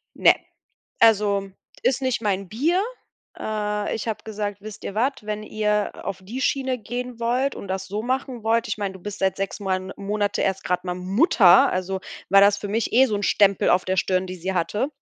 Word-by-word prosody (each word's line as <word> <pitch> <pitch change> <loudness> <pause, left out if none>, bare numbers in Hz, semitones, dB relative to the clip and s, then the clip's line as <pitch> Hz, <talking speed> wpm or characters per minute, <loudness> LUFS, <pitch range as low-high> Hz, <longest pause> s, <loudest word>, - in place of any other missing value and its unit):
Ne, - - +6 0.7
also, 205 -3 +4 0.3
ist 265 +1 +1
nicht 255 -3 0
mein 195 -3 -1
Bier. 325 - +1 0.6
Äh, 210 -1 -2
ich 225 +1 -4
hab 220 - -4
gesagt, 205 -2 -4
wisst 215 -1 -9
ihr 200 - -5
was, 250 0 0
wenn 210 0 -4
ihr 210 -1 0
auf 195 -2 -4
die 230 +8 -6
Schiene 265 -1 0
gehen 245 +2 -6
wollt 250 +4 +1
und 200 - -8
das 190 0 -3
so 205 +3 -4
machen 255 -1 -2
wollt, 230 +1 +1
ich 210 - -3
mein, 200 -2 -2
du 190 - -11
bist 205 +2 -7
seit 190 0 +1
6 195 +1 -4
Moan 190 -1 -2
Monate 205 0 -1
erst 195 0 -1
grad 180 +1 -1
mal 180 -1 -2
Mutter, 190 - +5
also 185 +1 -2 0.3
war 195 +1 +7
das 200 0 +5
für 205 - -6
mich 220 +2 -1
eh 255 +3 +6
so 215 - -2
'n 205 - -2
Stempel 200 -1 +3
auf 180 - +3
der 185 0 -1
Stirn, 185 0 +1
die 185 - -6
sie 185 +2 -3
hatte. 195 +9 0
205 Hz, 210 wpm, -23 LUFS, 195-230 Hz, 0.7 s, war